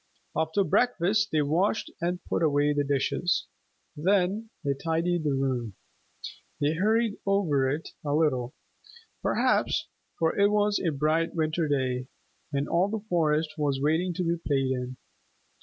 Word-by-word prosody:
After 160 +5 +1
breakfast 205 +2 +2
they 155 -1 +2
washed 175 +9 0
and 175 +1 -2
put - - -1
away 145 -2 +3
the 145 0 +1
dishes. 140 +5 0 0.5
Then 195 +6 +1
they 140 -2 +1
tidied 165 +4 -1
the 145 -3 +1
room. 125 -6 -1 0.8
They 145 +1 +2
hurried 215 +5 +1
over 165 -10 +2
it 150 +4 -3
a 145 -1 0
little, 130 -6 +1 0.7
perhaps, - - +1 0.3
for 165 -1 +1
it 200 0 +4
was 210 0 +2
a 175 - 0
bright 155 +4 0
winter 155 0 0
day, 130 -3 -1 0.4
and 140 0 -1
all 175 +3 +2
the 215 0 -4
forest 155 -2 +1
was 140 -2 0
waiting 160 +6 +1
to 180 - -1
be 170 0 0
played 135 -2 +1
in. 125 0 -3
160 Hz, 145 wpm, -27 LUFS, 145-180 Hz, 0.8 s, it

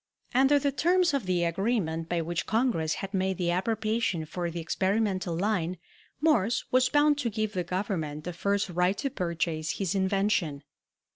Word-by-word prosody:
Under 270 +3 +5
the 280 0 +1
terms 350 +4 +2
of 270 -9 -1
the 180 -2 +1
agreement 170 -2 -1
by 175 -1 0
which 170 +1 -3
Congress 220 -10 +1
had 195 - -11
made 190 -1 0
the 175 -2 0
appropriation 215 -2 0
for 175 +2 -3
the 170 +1 -5
experimental 190 0 0
line, 185 -3 0 0.4
Morse 245 -8 +2
was 255 0 +4
bound 290 0 +3
to 245 - 0
give 215 0 -2
the 180 -2 -1
Government 170 -5 -3
the 180 - -5
first 200 +3 0
right 180 +2 +1
to 275 -2 -2
purchase 165 - -2
his 190 -4 -1
invention. 190 -6 0
190 Hz, 165 wpm, -28 LUFS, 170-225 Hz, 0.4 s, Under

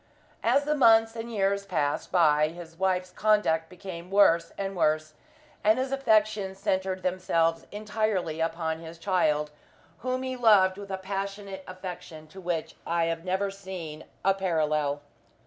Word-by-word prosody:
As 285 - +3
the 300 +1 +1
months 225 -5 +5
and 230 +1 -6
years 200 -2 +1
passed 155 -7 -1
by, 155 -4 +4
his 165 0 -10
wife's 185 0 0
conduct 195 -7 +2
became 180 -1 -9
worse 170 -4 +4
and 195 0 -3
worse, 155 -2 +1 0.5
and 215 +2 +4
his 260 +1 -1
affections 215 -7 +1
centered 190 -2 -1
themselves 170 -3 0
entirely 210 -6 -2
upon 160 -1 -1
his 165 0 -10
child, 155 -5 +1 0.5
whom 255 +1 -2
he 260 0 -3
loved 205 -6 +4
with 200 -1 -9
a 190 - -2
passionate 195 0 -5
affection 180 -4 -8
to 190 +4 -11
which 175 -3 -3
I 170 0 0
have 165 0 -2
never 190 +2 -1
seen 185 -6 -8 0.2
a 195 - +5
parallel. 155 -6 0
185 Hz, 145 wpm, -27 LUFS, 165-205 Hz, 0.5 s, months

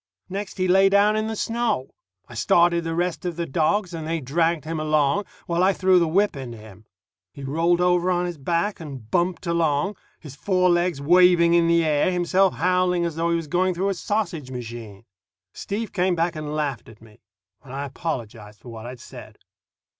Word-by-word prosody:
Next 200 +2 -5
he 185 -1 0
lay 195 +2 +5
down 200 +2 +4
in 215 0 -1
the 220 - -3
snow. 230 - -1 0.4
I - - -13
started 170 +8 +3
the 165 0 -3
rest 175 0 -2
of 175 -2 -3
the 170 0 -3
dogs, 175 +5 0
and 160 -2 -5
they 165 0 -1
dragged 165 +3 0
him 160 0 -3
along, 155 +5 +1 0.2
while 170 0 0
I 195 +1 +4
threw 185 -1 +3
the 170 - +1
whip 195 +3 +1
into 125 -4 -7
him. 110 -1 -14 0.5
He 140 - -9
rolled 165 +5 +1
over 180 0 +2
on 180 -1 +1
his 175 -3 -5
back 170 +8 -1
and 135 -9 -9
bumped 175 -1 0
along, 170 +2 0 0.2
his 145 -4 -11
four 185 +2 +2
legs 175 -3 +1
waving 175 +2 +5
in 170 -1 +4
the 170 0 +3
air, 150 +2 +2
himself 180 +2 +2
howling 180 -1 +1
as 170 -2 -3
though 165 +1 0
he 170 - +2
was 165 -1 -2
going 180 +3 0
through 190 +3 0
a - - 0
sausage 175 -7 -3
machine. 115 -4 -8 0.5
Steve 215 +2 -5
came 180 -1 +1
back 170 +1 0
and 150 -1 -5
laughed 140 -8 -3
at 110 -1 -16
me, 110 -1 -19 0.4
and 135 - -13
I 140 +1 -4
apologized 115 -7 -6
for 125 - -12
what 115 0 -8
I'd 125 0 -9
said. - - -12
170 Hz, 200 wpm, -23 LUFS, 145-180 Hz, 0.5 s, lay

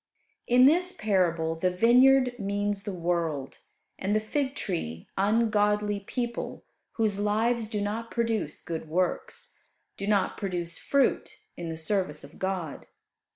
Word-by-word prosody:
In 250 +1 +6
this 355 +6 +4
parable 175 -6 +1
the 165 +3 0
vineyard 250 +6 +5
means 205 0 -1
the 205 - -4
world, 170 -6 -2 0.4
and 200 +3 0
the - - +4
fig 265 +5 -2
tree 85 - -4
ungodly 210 0 +2
people 235 +4 -4 0.3
whose 215 -3 0
lives 220 +3 +1
do 210 -1 -3
not 220 +3 -3
produce 230 -2 -1
good 160 -2 -5
works 180 +3 -2 0.4
do 200 - -4
not 205 -2 +1
produce 175 -4 -3
fruit 280 -1 +1 0.2
in 170 -1 -5
the 160 - -4
service 160 -3 -1
of 140 - -13
God. 185 -5 -3
205 Hz, 135 wpm, -28 LUFS, 175-230 Hz, 0.4 s, In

